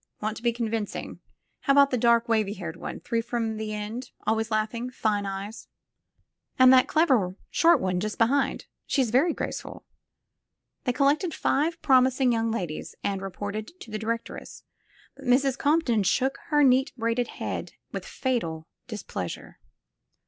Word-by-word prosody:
Want 215 Hz, +1 st, -2 dB
to -, -, -9 dB
be 235 Hz, 0 st, +2 dB
convincing. 225 Hz, -2 st, -3 dB, 0.4 s
How 275 Hz, -, +2 dB
about 280 Hz, 0 st, +6 dB
the -, -, +2 dB
dark, 235 Hz, 0 st, +4 dB
wavy 215 Hz, -3 st, +1 dB
haired 175 Hz, -5 st, -6 dB
one, -, -, -7 dB
three 230 Hz, -1 st, -1 dB
from 230 Hz, -2 st, -2 dB
the 215 Hz, 0 st, -4 dB
endf 215 Hz, +4 st, -5 dB, 0.2 s
Always 220 Hz, 0 st, +1 dB
laughing. 225 Hz, +3 st, -1 dB
Fine 210 Hz, -4 st, -1 dB
eyes." 195 Hz, +3 st, -6 dB, 0.9 s
And 255 Hz, 0 st, +8 dB
that 255 Hz, -1 st, +6 dB
clever 310 Hz, -6 st, +4 dB
looking 185 Hz, +2 st, -10 dB
short 335 Hz, +1 st, +5 dB
one 185 Hz, -1 st, 0 dB
just 210 Hz, +2 st, -3 dB
behind 265 Hz, +5 st, +1 dB
— -, -, -56 dB
she's 260 Hz, -6 st, +1 dB
very 280 Hz, +8 st, +4 dB
graceful." -, -, -5 dB, 1.0 s
They 250 Hz, -, +2 dB
collected 295 Hz, +6 st, +2 dB
five 320 Hz, +4 st, +1 dB
promising 260 Hz, -1 st, +4 dB
young 230 Hz, -1 st, +1 dB
ladies 180 Hz, -9 st, -4 dB
and 195 Hz, -1 st, -1 dB
re 195 Hz, -, -4 dB
ported 210 Hz, -, -6 dB
to 225 Hz, -, -11 dB
the 215 Hz, -, -3 dB
directress, 230 Hz, +1 st, -5 dB, 0.5 s
but -, -, -13 dB
Mrs. 260 Hz, +1 st, +3 dB
Compton 285 Hz, -7 st, +2 dB
shook 260 Hz, +7 st, +1 dB
her 295 Hz, -2 st, +4 dB
neat 260 Hz, 0 st, +4 dB
braided 230 Hz, +1 st, 0 dB
head -, -, -4 dB, 0.2 s
with -, -, -4 dB
fatal 165 Hz, -, -2 dB, 0.2 s
displeasure. 200 Hz, -, -6 dB
230 Hz, 160 wpm, -26 LUFS, 215-260 Hz, 1.0 s, And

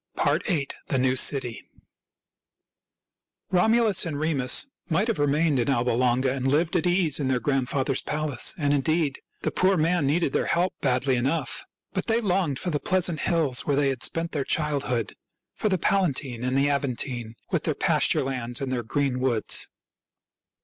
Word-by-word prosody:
VIII. 155 Hz, -9 st, 0 dB, 0.2 s
THE 135 Hz, -, 0 dB
NEW 130 Hz, 0 st, +2 dB
CITY 130 Hz, -3 st, 0 dB, 1.8 s
Romulus 220 Hz, +2 st, +3 dB
and 155 Hz, -4 st, -3 dB
Remus 145 Hz, -5 st, +2 dB, 0.2 s
might 185 Hz, +7 st, +1 dB
have 225 Hz, -, -1 dB
remained 145 Hz, 0 st, +2 dB
in 120 Hz, -, 0 dB
Alba 125 Hz, -2 st, +1 dB
Longa 125 Hz, +2 st, +1 dB
and 135 Hz, -1 st, -2 dB
lived 160 Hz, +6 st, +1 dB
at 175 Hz, 0 st, +1 dB
ease 175 Hz, -5 st, +2 dB
in 140 Hz, -, -1 dB
their 130 Hz, -1 st, +1 dB
grandfather's 135 Hz, 0 st, -1 dB
palace; 150 Hz, -3 st, 0 dB
and, 145 Hz, -3 st, +1 dB
indeed, 145 Hz, 0 st, 0 dB, 0.2 s
the -, -, 0 dB
poor 190 Hz, +1 st, +2 dB
man 165 Hz, -1 st, +1 dB
needed 150 Hz, 0 st, +1 dB
their -, -, 0 dB
help 175 Hz, +2 st, +1 dB
badly 130 Hz, -1 st, +1 dB
enough. 135 Hz, +7 st, -2 dB, 0.3 s
But -, -, -3 dB
they 225 Hz, 0 st, +2 dB
longed 180 Hz, -, 0 dB
for 180 Hz, -, -2 dB
the 145 Hz, -, -1 dB
pleasant 180 Hz, -3 st, +1 dB
hills 155 Hz, -8 st, 0 dB
where 145 Hz, -, +2 dB
they 140 Hz, -1 st, +2 dB
had 130 Hz, -2 st, -3 dB
spent 165 Hz, 0 st, 0 dB
their 145 Hz, -3 st, -1 dB
childhood 140 Hz, -7 st, -1 dB, 0.2 s
— -, -, -61 dB
for 215 Hz, -, +1 dB
the 190 Hz, -, +1 dB
Palatine 140 Hz, -10 st, 0 dB
and 130 Hz, +1 st, 0 dB
the 140 Hz, +1 st, +3 dB
Aventine, 125 Hz, -4 st, -1 dB, 0.2 s
with -, -, 0 dB
their -, -, 0 dB
pasture -, -, +2 dB
lands 125 Hz, -3 st, -3 dB
and 135 Hz, -2 st, -3 dB
their 125 Hz, -2 st, -1 dB
green 130 Hz, +2 st, -1 dB
woods. 125 Hz, -4 st, +1 dB
140 Hz, 170 wpm, -25 LUFS, 130-165 Hz, 1.8 s, Romulus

